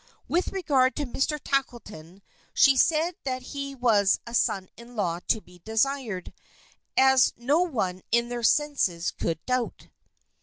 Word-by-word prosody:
With 350 +2 0
regard 275 -9 +1
to 295 - -2
Mr. 280 +4 -1
Tackleton, 210 - -4 0.3
she 275 -1 +6
said 320 +6 +2
that 255 -1 -3
he 275 -1 -5
was 215 -6 +3
a 235 - -9
son 195 -5 +1
in 235 +1 -14
law 175 -5 -1
to 220 - +1
be 180 -2 -19
desired, 225 -3 -1 0.6
as 265 -1 +5
no 280 +7 +1
one 205 - -2
in 235 0 +2
their 240 0 -4
senses 230 - +1
could 165 -1 -4
doubt. 255 -2 -2
245 Hz, 145 wpm, -26 LUFS, 205-275 Hz, 0.6 s, she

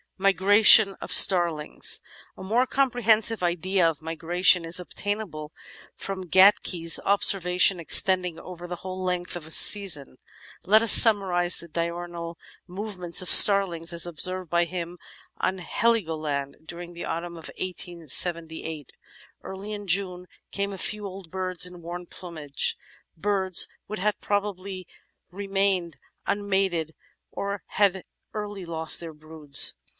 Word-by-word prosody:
Migration 195 +2 +5
of - - -9
Starlings 170 -5 +4 0.4
A - - -11
more 235 +7 -1
comprehensive 230 -5 0
idea 180 +1 -1
of 160 -1 -4
migration 170 +2 0
is 165 +2 -1
obtainable 180 -5 -6 0.4
from 190 -2 -7
Gatke's 185 -3 +3
observations 185 -2 +1
extending 180 0 +2
over 175 -1 -11
the 175 0 -7
whole 185 +1 -8
length 180 -1 -4
of 170 -3 -9
a - - -11
season; 160 -10 +5 0.5
let 215 +4 +3
us 230 - +5
summarise 185 -6 +6
the 170 - -11
diurnal 170 0 -6 0.3
movements 185 -2 -3
of - - -4
starlings, 180 -5 +6
as 170 - -1
observed 185 +1 -6
by 170 +1 0
him 175 0 -8 0.4
on 190 - -3
Heligoland 160 -9 -3
during 175 0 -10
the 170 - -8
autumn 170 +1 -6
of 165 - -11
1878. 165 -3 -2 0.5
Early 195 +2 -9
in 205 -1 -8
June 180 0 -2 0.2
came 200 0 -4
a - - -9
few 210 +2 -3
old 190 -3 -11
birds 185 -1 -2
in 180 -1 -11
worn 175 +1 -9
plumage, 155 -7 -4 0.4
birds 190 0 +2 0.2
which 215 -1 -7
had 210 +2 -2
probably 200 -2 -5 0.4
ren^ained 195 -3 -3 0.3
unmated 190 -5 -2 0.4
or 200 0 -6
had 195 -2 -1 0.3
early 205 -3 -7
lost 160 -1 -2
their 165 -2 -9
broods. 150 - +1
180 Hz, 130 wpm, -24 LUFS, 170-195 Hz, 0.5 s, summarise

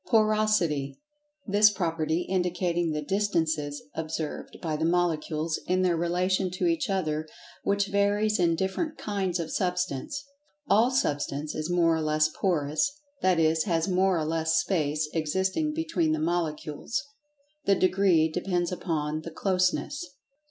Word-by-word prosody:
Porosity: 215 - +2 0.5
That 210 0 +5
property 165 -2 0
indicating 175 -2 0
the 150 0 -2
distances 160 -6 -1
observed 160 -1 -4
by 160 -2 -2
the 155 - -2
Molecules 165 -2 0
in 185 +1 +2
their 180 -2 +3
relation 180 +3 +1
to 185 - -1
each 325 -7 +1
other, 155 -5 -1 0.3
which 200 0 +1
varies 205 +1 +1
in 170 -2 +3
different 190 - -2
"kinds" 190 -4 -2
of 160 -2 -4
Substance. 180 - -2 0.4
All 225 +2 +4
Substance 150 - -1
is 155 +2 -3
more 170 -2 +3
or 160 - -1
less 155 0 +2
Porous, 165 - +1 0.3
that 185 -2 +3
is, 160 0 +3
has 165 -3 +1
more 190 -1 +2
or 155 - -1
less 160 0 0
space 155 -2 +1
existing 190 - 0
between 185 - 0
the 155 - -1
Molecules—the 230 - -3
degree 185 -4 +3
depends 175 +2 -1
upon 155 -4 -2
the 165 - -7
"closeness." 185 - 0
175 Hz, 135 wpm, -27 LUFS, 155-200 Hz, 0.5 s, That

